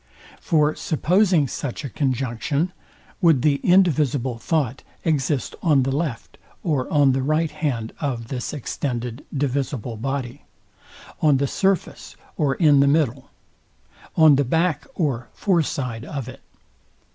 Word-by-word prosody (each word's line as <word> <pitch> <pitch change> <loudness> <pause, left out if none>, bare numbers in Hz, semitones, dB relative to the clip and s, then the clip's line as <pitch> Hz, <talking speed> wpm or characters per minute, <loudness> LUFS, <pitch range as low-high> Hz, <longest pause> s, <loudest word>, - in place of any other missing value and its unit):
For 155 -3 +2
supposing 175 -1 +2
such 140 +3 -5
a - - -4
conjunction, 135 +5 -1 0.5
would 160 -8 +4
the 145 -2 +3
indivisible 145 -9 +2
thought 140 -2 -1 0.2
exist 145 -4 0
on 150 -6 +3
the 135 - -1
left 145 -6 -4 0.2
or 145 -7 -1
on 145 -3 +4
the 130 +1 0
right 155 +3 +1
hand 125 -8 -3
of 120 -6 -3
this 125 -2 -4
extended 125 -3 -4
divisible 135 -4 -2
body? 130 0 -4 0.8
On 150 -3 +4
the 140 - +1
surface 190 +6 -1 0.2
or 145 -3 +1
in 150 -5 +5
the 140 - +5
middle? 140 -3 +1 0.9
On 155 -4 +7
the 145 - +3
back 165 - 0
or 130 - -1
fore 185 -5 +2
side 125 -6 -3
of 140 -4 -5
it? 130 +1 -10
140 Hz, 135 wpm, -22 LUFS, 130-155 Hz, 0.9 s, On